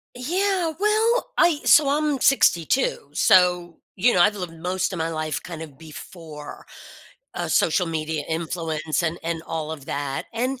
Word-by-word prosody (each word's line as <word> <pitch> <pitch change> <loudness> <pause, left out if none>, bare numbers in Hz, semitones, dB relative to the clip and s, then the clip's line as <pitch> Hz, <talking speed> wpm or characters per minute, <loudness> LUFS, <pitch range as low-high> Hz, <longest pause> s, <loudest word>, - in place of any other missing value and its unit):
Yeah, 350 +5 -1
well, 440 +5 +1
I 330 -4 +4
so 300 -2 +6
I'm 295 0 0
62, 175 - +2
so, 180 0 +3 0.2
you 225 +6 +3
know, - - +2
I've 205 +4 +4
lived 180 -4 -6
most 180 +3 -2
of 180 - -5
my 160 0 -1
life 155 -1 -3
kind 170 -3 -8
of 150 -4 -10
before, 155 -1 -11 0.7
uh, - - -3
social 180 - +2
media 155 -1 -3
influence 160 -1 -2
and 170 0 -2
and 165 -1 -3
all 160 -1 -4
of 145 -3 -9
that, 140 -1 -4
and, 250 +3 -2
175 Hz, 160 wpm, -23 LUFS, 160-265 Hz, 0.7 s, so